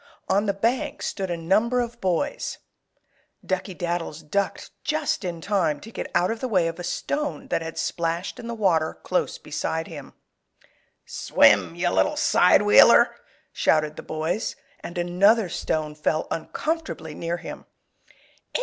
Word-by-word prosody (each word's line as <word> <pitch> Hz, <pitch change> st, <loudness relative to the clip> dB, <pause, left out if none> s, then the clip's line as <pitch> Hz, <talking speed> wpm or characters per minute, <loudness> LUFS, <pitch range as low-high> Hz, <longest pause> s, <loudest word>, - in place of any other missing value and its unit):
On 205 Hz, +2 st, +2 dB
the 200 Hz, -, +2 dB
bank 230 Hz, +6 st, -1 dB
stood 190 Hz, -2 st, -3 dB
a 175 Hz, -, -2 dB
number 210 Hz, +9 st, +2 dB
of 240 Hz, -1 st, -3 dB
boys. 185 Hz, -, -1 dB, 0.9 s
Duckey 185 Hz, 0 st, -3 dB
Daddles 170 Hz, -2 st, -3 dB
ducked 200 Hz, +6 st, -2 dB
just 305 Hz, -7 st, -1 dB
in 170 Hz, -2 st, -4 dB
time 170 Hz, -6 st, 0 dB
to 225 Hz, -, -11 dB
get -, -, -5 dB
out 175 Hz, +3 st, +3 dB
of 225 Hz, -, -4 dB
the 260 Hz, -, -2 dB
way 185 Hz, -8 st, +2 dB
of 165 Hz, +1 st, -5 dB
a -, -, -5 dB
stone 285 Hz, +7 st, -3 dB
that 165 Hz, -6 st, -2 dB
splashed 170 Hz, +2 st, -2 dB
in 235 Hz, -, -7 dB
the 235 Hz, -, -4 dB
water 170 Hz, -7 st, +1 dB
close -, -, -1 dB
beside 160 Hz, 0 st, -3 dB
him. 150 Hz, -5 st, -10 dB, 0.9 s
"Swim, -, -, +3 dB
you -, -, 0 dB
little -, -, +2 dB
side -, -, +5 dB
wheeler!" -, -, +7 dB, 0.4 s
shouted 155 Hz, -1 st, +2 dB
the -, -, -7 dB
boys, 160 Hz, +6 st, -2 dB, 0.2 s
and 175 Hz, -, -8 dB
another 185 Hz, +4 st, +3 dB
stone 155 Hz, -2 st, -2 dB
fell 155 Hz, +1 st, -1 dB
uncomfortably 305 Hz, -, -3 dB
near 170 Hz, +3 st, -3 dB
him. -, -, -9 dB
180 Hz, 150 wpm, -24 LUFS, 165-220 Hz, 0.9 s, wheeler